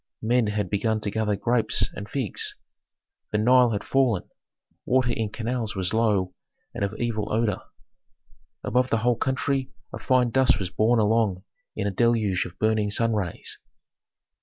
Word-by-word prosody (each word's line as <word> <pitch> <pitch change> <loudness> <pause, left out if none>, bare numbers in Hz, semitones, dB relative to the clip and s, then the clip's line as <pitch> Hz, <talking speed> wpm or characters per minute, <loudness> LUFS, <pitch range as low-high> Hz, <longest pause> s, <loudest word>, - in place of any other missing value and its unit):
Men 120 0 +2
had 105 -3 -2
begun 110 +2 0
to 100 - -3
gather 105 -1 0
grapes 115 +3 +1
and 100 +1 -8
figs. 130 -8 -2 0.8
The 105 - +1
Nile 125 +3 +5
had 105 -2 -2
fallen, 130 -8 +1 0.6
water 130 -1 +2
in 110 -2 -2
canals 115 0 -3
was 95 0 -2
low 105 -5 +1 0.4
and - - -3
of 100 +2 -2
evil 110 -3 -2
odor. 110 -3 0 1.0
Above 125 +2 +1
the 115 - +2
whole 120 -1 +4
country 130 +2 -1 0.2
a - - -5
fine 125 -2 +2
dust 130 -5 +4
was 95 -3 -4
borne 115 +3 +2
along 105 -3 +1 0.3
in 105 - -2
a 100 - 0
deluge 105 -4 +1
of - - -10
burning 110 -1 +1
sun 115 +2 0
rays. 100 -6 -3
110 Hz, 160 wpm, -25 LUFS, 105-120 Hz, 1.0 s, Nile